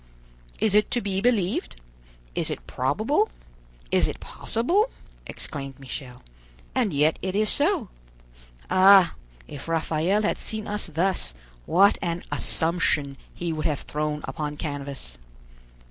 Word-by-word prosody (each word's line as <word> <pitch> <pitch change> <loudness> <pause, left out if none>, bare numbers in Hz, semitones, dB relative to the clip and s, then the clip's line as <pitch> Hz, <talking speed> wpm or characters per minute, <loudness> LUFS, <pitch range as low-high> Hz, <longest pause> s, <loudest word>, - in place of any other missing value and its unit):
"Is 215 - +2
it 210 +1 +4
to 245 - +1
be 195 -3 -2
believed? 210 -6 +1 0.6
is - - +2
it - - -5
probable? 215 - +1 0.6
is - - +4
it - - -5
possible?" 355 - +1 0.4
exclaimed 135 -3 -6
Michel; 130 -2 -8 0.5
"and 245 -6 +1
yet 150 +2 +2
it 185 +1 -3
is 215 +1 +3
so. 300 - +3 0.8
Ah! 185 -1 +7 0.3
if 145 +1 -9
Raphael 165 +5 +1
had 210 - 0
seen 215 -1 -3
us 210 -1 -2
thus, 165 - 0 0.3
what 195 +4 +5
an 170 -1 -2
'Assumption' 160 -4 0 0.2
he 170 -1 -3
would 155 0 -1
have 150 -3 -1
thrown 150 0 -2
upon 150 -1 -4
canvas!" 140 - -5
175 Hz, 130 wpm, -25 LUFS, 150-210 Hz, 0.8 s, Ah